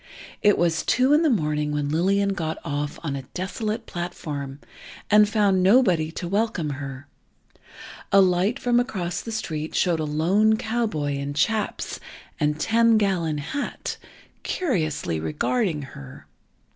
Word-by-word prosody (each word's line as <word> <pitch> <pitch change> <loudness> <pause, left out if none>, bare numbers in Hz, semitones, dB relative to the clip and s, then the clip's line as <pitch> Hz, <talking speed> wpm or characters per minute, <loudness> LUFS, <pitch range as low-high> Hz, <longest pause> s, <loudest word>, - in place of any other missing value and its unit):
It 205 -1 +4
was 170 -1 +2
two 255 +3 +3
in 300 - +5
the 325 - +3
morning 150 - 0
when 145 -1 -1
Lillian 195 +5 +2
got 160 -4 -3
off 145 +1 -3
on 145 -4 -2
a 135 - -4
desolate 215 +5 -3
platform, 145 -6 -5 0.5
and 210 0 +6
found 200 -3 +3
nobody 185 -6 +4
to 175 - -5
welcome 195 -5 0
her. 135 -1 -7 1.1
A 200 - +6
light 190 +5 +3
from 245 -2 +2
across 185 -9 -2
the 230 - -7
street 160 -8 -4
showed 175 -3 +2
a - - -1
lone 185 +9 +2
cowboy, 215 -12 -1
in 140 +1 -4
chaps, 210 +9 -1 0.4
and 150 0 0
"ten 230 +4 +4
gallon 180 -7 0
hat," 215 - -4 0.4
curiously 155 - -1
regarding 150 - -1
her. 70 - -11
175 Hz, 140 wpm, -24 LUFS, 150-215 Hz, 1.1 s, and